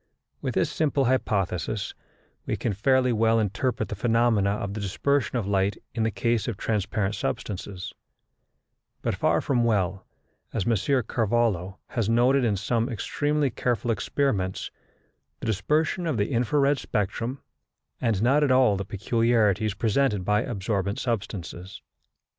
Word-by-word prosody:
With - - -3
this - - +1
simple 145 -3 +1
hypothesis 100 -5 0 0.5
we - - -1
can 115 - -1
fairly 125 +5 +2
well 115 +1 +3
interpret 110 +1 -1
the 105 - -3
phenomena 115 -2 +2
of 100 -1 -2
the 110 - -4
dispersion 130 +7 0
of 115 - -1
light 100 0 +1 0.2
in 115 - -2
the 110 - +2
case 115 +1 0
of 115 -5 -3
transparent 105 -1 -1
substances; 95 -3 -4 1.1
but - - 0
far - - +2
from 125 -4 +1
well, 95 -4 0 0.5
as 105 -5 -1
M. 120 - +3 0.3
Carvallo 110 -5 0
has 115 -3 -1
noted 125 +4 +4
in 105 -4 +1
some 115 +4 0
extremely 145 +4 0
careful 120 0 -1
experiments, 105 -4 -1 0.7
the - - -6
dispersion 150 - 0
of 150 -7 0
the 105 +5 0
infra 120 +3 +1
red 140 0 +3
spectrum, 115 +7 -2 0.6
and 115 -4 +1
not 140 +5 +4
at 145 - +2
all 130 -6 +4
the 100 - -4
peculiarities 110 0 +1
presented 105 -2 +1
by 105 +1 +3
absorbent 100 -2 -2
substances. 95 -7 -4
110 Hz, 140 wpm, -26 LUFS, 100-125 Hz, 1.1 s, noted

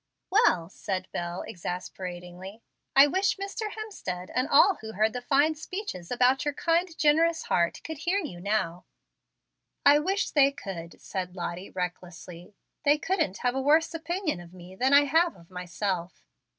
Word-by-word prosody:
"Well," 370 - +4
said 185 -1 -4
Bel, 175 +1 -4
exasperatingly, 180 +3 -7 0.3
"I 275 +1 +9
wish 375 +7 +1
Mr. 400 +2 -4
Hemstead 190 - -6
and 255 +2 +1
all 375 +7 +6
who 220 0 -7
heard 215 +2 +1
the 250 - -4
fine 285 +5 +3
speeches 310 - -6
about 250 +2 +3
your 290 -1 -2
'kind, 335 0 0
generous 320 +2 +3
heart' 170 -1 0
could 320 -3 -6
hear 350 +6 0
you 300 - -4
now." 180 -4 -1 1.0
"I 290 +1 +7
wish 385 +6 -1
they 280 -2 +5
could," 180 - -8
said 185 -1 -5
Lottie, 175 +1 -5
recklessly. 180 0 -7 0.3
"They 290 +1 +4
couldn't 310 - -1
have 245 - +3
a 265 - -1
worse 310 +4 +3
opinion 330 - -2
of 175 +1 -13
me 180 +1 -12
than 260 +7 +1
I 285 +1 +7
have 325 +5 +2
of 170 0 -19
myself." 180 0 -4
245 Hz, 160 wpm, -27 LUFS, -, 1.0 s, I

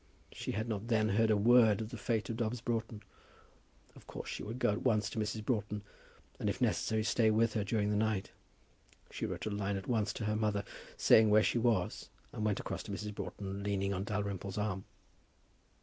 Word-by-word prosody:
She - - -4
had 110 +3 -2
not 110 -1 -3
then 110 -2 +2
heard 110 +2 +3
a 105 - +4
word 115 -1 +6
of 110 -1 -4
the - - -5
fate 110 +1 -1
of 115 - -4
Dobbs 115 0 -1
Broughton. 115 -2 -3 0.9
Of - - -16
course - - -7
she - - -4
would 110 +4 -5
go 120 -3 +2
at 105 - -2
once 105 -5 +1
to - - -3
Mrs. 105 0 -2
Broughton, 105 -3 -1 0.6
and - - 0
if - - -3
necessary 110 -1 +1
stay 110 0 +3
with 110 +1 +3
her 105 - 0
during 105 0 0
the - - +1
night. 105 -2 0 0.8
She - - -3
wrote - - -5
a 110 - -2
line 100 -1 -1
at 95 - -6
once 110 -4 +1
to 110 - -4
her 105 0 0
mother, 105 -2 0 0.3
saying 110 -1 +6
where 105 +1 +6
she 120 - +2
was, 115 -6 0 0.2
and 110 - -4
went 105 -2 +1
across - - -4
to - - -8
Mrs. 105 +1 -4
Broughton 100 0 -5
leaning 100 -1 0
on 95 0 -2
Dalrymple's 100 -2 -3
arm. 100 -2 -2
105 Hz, 210 wpm, -33 LUFS, 100-110 Hz, 0.9 s, word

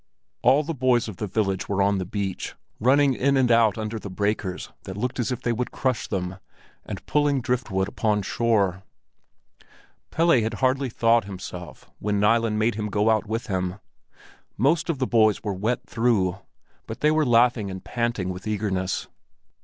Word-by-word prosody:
All 135 +5 +4
the 165 +2 -3
boys 125 -4 +2
of 105 -5 -7
the 105 - -3
village 95 -1 -1
were 100 -1 0
on 100 0 +2
the 95 - -3
beach, 100 -1 -4 0.2
running 135 +3 +4
in 140 +2 +2
and 125 -2 +3
out 115 -3 +4
under 110 0 -3
the 100 - -7
breakers 100 -1 -2
that 95 0 -7
looked 125 +4 -2
as 120 - 0
if 125 - -4
they 120 - +1
would 125 +2 -2
crush 130 -4 -1
them, 90 -2 -3 0.5
and - - -7
pulling 145 -1 +2
driftwood 120 -6 -1
upon 105 -2 0
shore. 100 -4 +1 1.3
Pelle 165 -6 +3
had 110 +1 -2
hardly 130 +5 +1
thawed 115 -1 +3
himself 90 -5 -8
when 105 0 0
Nilen 115 +1 +2
made 110 +2 +2
him 105 0 -3
go 105 +2 +2
out 110 -1 +1
with 115 +3 -2
him. 90 -4 -2 0.8
Most 150 - +2
of 165 - 0
the 130 - 0
boys 110 -4 +3
were 105 - -2
wet 115 +6 -2
through, 105 -6 +1 0.5
but 115 +3 -7
they 150 - +4
were 155 0 +3
laughing 120 -4 +3
and 95 -1 -7
panting 115 -6 -2
with 90 +3 -6
eagerness. 95 -3 -1
110 Hz, 175 wpm, -24 LUFS, 100-125 Hz, 1.3 s, All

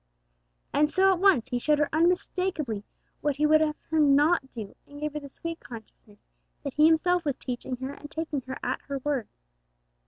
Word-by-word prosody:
And 300 +1 +3
so, 385 +3 +4
at 360 - -3
once, 360 - +4
He 245 -2 -1
showed 300 +4 +2
her 300 0 +2
unmistakeably 330 - 0 0.4
what 290 -2 0
He 300 +2 +1
would 310 +1 +5
have 305 -1 +1 0.2
her 320 - +2
not 290 0 +4
do, 220 -5 -8
and 290 0 -11
gave 300 0 -3
her 300 - -3
the 285 -1 -10
sweet 335 +4 -6
consciousness 220 -2 -13 0.5
that 280 -3 -4
He 305 +1 +6
Himself 350 +2 +3
was 285 -4 -1
teaching 250 0 -4
her 260 +2 -5
and 290 +1 -10
taking 315 -3 -3
her 260 - -4
at 255 - -2
her 280 -1 -2
word. 280 -7 -1
295 Hz, 195 wpm, -27 LUFS, 265-320 Hz, 0.5 s, He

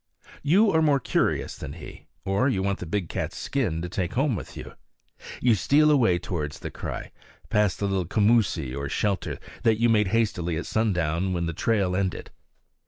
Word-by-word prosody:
You 195 +9 +4
are 160 - +3
more 145 -3 +3
curious - - 0
than - - -7
he, - - -11 0.2
or 100 +8 +2
you 95 -8 0
want 100 0 -1
the 90 - -6
big 90 +1 -2
cat's - - -4
skin 90 - -1
to - - -3
take 90 -1 -3
home 135 -1 +1
with - - -8
you. - - -8 0.7
You 120 -2 +4
steal 150 +9 +4
away 115 -11 +4
towards 80 -5 -4
the - - -7
cry, - - -6 0.4
past 105 -3 +2
the 100 - -2
little 95 -3 -1
commoosie, 100 - +2
or 70 0 -4
shelter, 100 +4 -1 0.2
that 110 -1 +2
you 120 0 +3
made 105 -3 +3
hastily 90 -6 0
at 85 - -4
sundown 90 -4 0
when 85 -1 -1
the 85 - -2
trail 100 0 +1
ended. 95 -1 -2
100 Hz, 185 wpm, -26 LUFS, 90-115 Hz, 0.7 s, You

